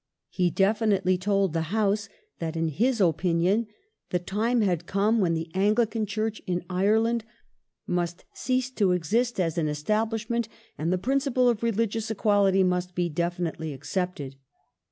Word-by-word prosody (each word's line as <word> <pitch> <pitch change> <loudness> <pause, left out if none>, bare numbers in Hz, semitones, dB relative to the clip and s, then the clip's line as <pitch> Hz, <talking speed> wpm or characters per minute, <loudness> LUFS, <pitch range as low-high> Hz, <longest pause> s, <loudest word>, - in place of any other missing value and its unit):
He 180 -2 +1
definitely 195 -1 +2
told 195 -2 +1
the 165 -1 -2
House 210 0 0 0.3
that 165 -1 -3
in 165 0 0
his 230 - +1
opinion 180 +4 +2 0.4
the 180 - +1
time 215 +7 0
had 175 -4 0
come 210 +3 +2
when 170 -4 +2
the 160 0 -4
Anglican 215 +3 +1
Church 215 +1 -2
in 180 -1 -1
Ireland 220 +5 +2 0.6
must 175 0 -2
cease 255 0 -1
to 200 -7 +2
exist 220 +7 0
as 170 -2 0
an 155 - 0
Establishment, 220 +8 -1 0.3
and 160 +3 -2
the 185 - +2
principle 260 +3 +1
of 235 -3 +1
re 230 0 +1
ligious 225 0 -1
equality 200 -3 +3
must 180 -1 -1
be 175 -1 0
definitely 170 -1 -2
accepted. 145 -1 -4
195 Hz, 150 wpm, -26 LUFS, 175-220 Hz, 0.6 s, equality